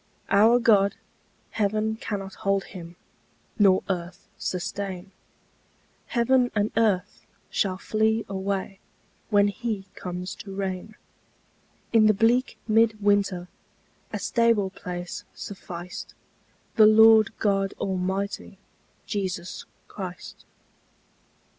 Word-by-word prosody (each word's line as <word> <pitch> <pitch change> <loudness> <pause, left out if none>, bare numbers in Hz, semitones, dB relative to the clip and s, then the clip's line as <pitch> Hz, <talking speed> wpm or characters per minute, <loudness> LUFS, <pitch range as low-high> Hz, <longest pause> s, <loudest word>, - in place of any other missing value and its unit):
Our 220 +4 +6
God, 205 -5 +4 0.6
heaven 215 +1 0
cannot 205 -6 -5
hold 195 0 +1
Him, 170 -1 -10 0.6
Nor 195 -2 +5
earth 180 -1 -5
sustain; 190 +1 -4 1.0
Heaven 245 +1 +2
and 210 0 +1
earth 215 -5 0 0.2
shall 185 -2 0
flee 220 +3 0
away 195 0 -3 0.5
When 205 -1 +4
He 210 -2 -4
comes 180 +1 -5
to 195 -1 -9
reign: 195 +2 -4 1.0
In 220 -2 +6
the 215 - +4
bleak 235 +4 +2
mid 220 0 +3
winter 200 -3 +1 0.6
A - - -2
stable 230 -5 +2
place 175 -2 -6
sufficed 180 -3 -8 0.6
The 215 -1 +8
Lord 220 0 +7
God 195 -2 +1
Almighty, 190 +1 -3 0.5
Jesus 185 -4 -4 0.2
Christ. 185 -2 -8
200 Hz, 95 wpm, -25 LUFS, 190-220 Hz, 1.0 s, The